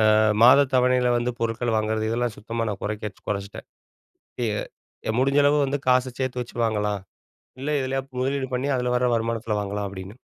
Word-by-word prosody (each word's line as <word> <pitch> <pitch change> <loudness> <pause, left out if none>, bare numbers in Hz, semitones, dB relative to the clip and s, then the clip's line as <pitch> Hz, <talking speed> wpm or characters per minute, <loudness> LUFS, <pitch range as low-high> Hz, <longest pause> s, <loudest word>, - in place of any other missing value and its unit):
அ - - +4 0.3
மாதத் 135 +2 +7
தவணையில 125 -1 +3
வந்து 120 +1 -1
பொருட்கள் 115 0 -1
வாங்குறது 110 0 0
இதெல்லாம் 120 -1 -1
சுத்தமா 115 +1 -3
நான் 100 - -5
குறைக்கச் 105 -1 -5
குறைச்சிட்டேன். 100 0 -5 1.4
அ - - +1
முடிஞ்ச 140 +2 +3
அளவு 145 +1 +4
வந்து 140 +1 -1
காசை 125 0 +3
சேர்த்து 125 -1 -1
வச்சு 120 - -9
வாங்கலாம். 105 -2 -1 0.6
இல்ல 145 - -3
இதுலயா 135 +1 -1 0.2
முதலீடு 135 0 -1
பண்ணி 130 +3 -1
அதுல 125 0 0
வர 125 0 +2
வருமானத்துல 115 -2 -1
வாங்கலாம் 100 0 -3
அப்படின்னு. 95 +2 -9
120 Hz, 165 wpm, -24 LUFS, 105-130 Hz, 1.4 s, மாதத்